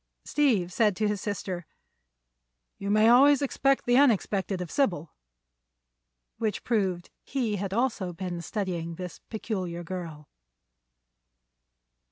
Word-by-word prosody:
Steve 220 -12 +1
said 210 -2 +3
to 215 +2 0
his 210 -2 -2
sister: 185 -4 -4 1.1
"You 200 - -4
may 215 +2 +5
always 275 +4 +6
expect 275 0 +1
the 245 +1 +4
unexpected 205 -7 +2
of 180 -3 -5
Sybil." 175 - 0 1.3
Which 215 -3 -2
proved 190 -7 -1
he 235 -7 -1
had 195 0 -3
also 220 -4 0
been 175 0 -5
studying 170 -3 -3
this 180 0 -7
peculiar 185 -6 -4
girl. 165 -4 -7
200 Hz, 115 wpm, -27 LUFS, 175-230 Hz, 1.3 s, always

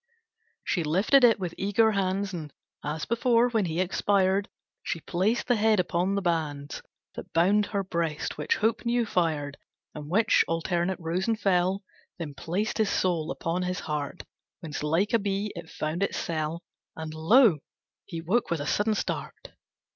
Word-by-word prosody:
She 175 - 0
lifted 195 - +4
it 230 -3 +6
with 180 -3 -3
eager 205 +3 +3
hands 195 0 -1
And 155 -4 -6 0.3
as 150 +2 -3
before, 235 +1 +3
when 220 -4 +1
he 165 0 -2
expired, 195 +1 +1 0.3
She 165 - -3
placed 195 +9 0
the 245 - +2
head 215 -1 +3
upon 180 +2 0
the 200 - -1
bands 150 -5 -2 0.3
That - - -9
bound 200 +5 +3
her 200 -2 -1
breast 170 -4 -2
which 150 - 0
hope 220 +1 0
new 240 0 +1
fired, 155 -7 -1 0.3
And 150 -1 -8
which 220 +5 +4
alternate 170 +2 -1
rose 170 +3 -2
and 225 -1 0
fell; 190 0 +1 0.3
Then 160 -5 -5
placed 185 +10 -2
his 215 -2 +3
soul 170 -4 0
upon 170 +1 -2
his 180 0 -2
heart 150 +2 -4 0.4
Whence 155 -4 -5
like 165 +9 +1
a 230 - +5
bee 200 +1 -2
it 170 -1 -8
found 155 +4 -3
its 200 - 0
cell, 160 +1 -3 0.3
And 160 -1 -6
lo, 175 - +5 0.5
he 165 -4 -5
woke 195 +9 0
with 155 -3 -2
sudden 210 +5 +1
start! - - -4
180 Hz, 165 wpm, -27 LUFS, 165-205 Hz, 0.5 s, it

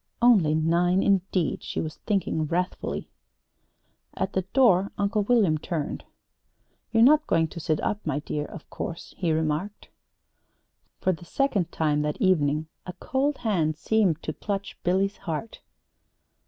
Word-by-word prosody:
"'Only 205 -11 +5
nine,' 175 +4 +2
indeed!" 190 -3 +1
she - - -4
was 155 -1 -4
thinking 180 -6 0
wrathfully. 180 +4 -2 1.1
At 190 +1 -2
the 190 - +1
door 195 -1 +3
Uncle 205 +1 +1
William 205 -8 +3
turned. 160 -3 -4 0.9
"You're 225 0 +5
not 300 +4 +5
going 165 -1 +2
to 170 - -8
sit 155 -1 0
up, 210 0 -2
my 150 -3 -1
dear, 150 0 -3
of 160 - -11
course," 170 - -6
he 175 -3 +1
remarked. 160 +6 -2 1.1
For 185 - +2
the 175 -1 -6
second 195 -4 0
time 150 -2 +1
that 150 0 -2
evening 155 -5 +2 0.2
a 180 - -5
cold 275 +7 -1
hand 160 -8 +1
seemed 180 -2 +1
to 155 - -3
clutch 200 +2 -4
Billy's 195 +3 +1
heart. 175 +6 -5
180 Hz, 140 wpm, -26 LUFS, 155-205 Hz, 1.1 s, Only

